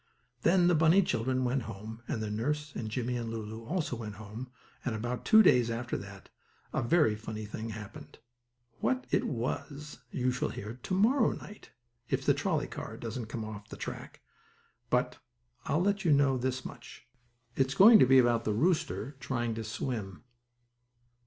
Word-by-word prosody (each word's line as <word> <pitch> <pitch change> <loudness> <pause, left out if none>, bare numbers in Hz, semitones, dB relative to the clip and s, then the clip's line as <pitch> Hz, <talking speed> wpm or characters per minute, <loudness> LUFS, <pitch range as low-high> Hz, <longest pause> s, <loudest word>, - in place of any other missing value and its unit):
Then 175 +1 +4
the 175 - +5
bunny 165 +5 +5
children 130 -3 0
went 125 +2 +1
home 110 +1 -8
with 110 - -2
their 105 -1 -3
nurse 150 +7 -2
and 110 - -4
Jimmie 125 +2 -2
and 115 -1 -4
Lulu 110 0 -6
also 160 -3 -2
went 110 -3 -6
home 110 +4 -8 0.3
and 120 -3 -2
about 120 +3 -4
two 220 0 +7
days 125 - +5
after 120 +1 -3
that 100 -1 -8 0.4
a - - +1
very 145 -1 +3
funny 110 0 -6
thing 110 +2 -6
happened. 105 -2 -9 0.6
What 125 +1 0
it - - +2
was 140 +4 -4
you 125 +1 0
shall 125 - -1
hear 110 +5 -7
to 185 - -4
morrow 230 +9 +4
night 210 - -11 0.4
if - - -1
the - - +5
trolley - - 0
car - - -7
doesn't 115 0 -5
get 115 -2 -3
off 105 -1 -8
the - - -8
track, - - -7 0.7
but - - 0 0.5
I'll 155 +5 +1
let 200 0 +1
you 170 - +3
know 140 -2 +4
this 130 +1 -2
much - - -10 0.5
it's 135 0 +1
going 215 +3 +9
to 130 - +6
be 135 +1 +6
about 120 -2 +4
the 110 - 0
rooster 145 - 0
trying 120 -4 -2
to 110 0 -4
swim. 110 -3 -4
120 Hz, 175 wpm, -30 LUFS, 110-145 Hz, 0.7 s, going